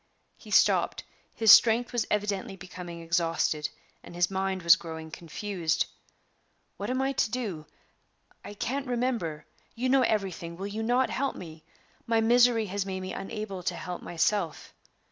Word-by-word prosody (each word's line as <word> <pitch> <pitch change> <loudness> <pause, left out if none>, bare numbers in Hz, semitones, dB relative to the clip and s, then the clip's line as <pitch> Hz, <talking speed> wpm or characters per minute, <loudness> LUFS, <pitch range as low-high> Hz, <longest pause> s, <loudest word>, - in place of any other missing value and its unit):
He - - -15
stopped; - - +3 0.3
his 225 -2 +6
strength 240 +2 +6
was 240 -2 0
evidently 200 -2 -1
becoming 180 -2 -9
exhausted, 165 -2 0 0.3
and 175 - -11
his 175 +1 +1
mind 190 -1 -2
was 170 0 +8
growing 160 -1 -8
confused. 170 0 -2 0.9
"What - - -4
am 260 +1 0
I 270 - +1
to 255 - 0
do? 205 -11 -4 0.8
I 205 - -9
can't 270 +6 -3
remember. 235 -11 -2 0.3
You 250 +2 -1
know 270 0 +5
everything 190 -7 -1
will 195 - -5
you 205 +2 -4
not 245 +3 +2
help 275 +1 -1
me? 160 -3 -10 0.4
My 230 -1 +3
misery 235 0 +4
has 200 0 -2
made 190 -1 -4
me 185 - -5
unable 205 -2 -5
to 175 - -2
help 180 -1 -6
myself." 175 0 -1
195 Hz, 155 wpm, -28 LUFS, 170-230 Hz, 0.9 s, was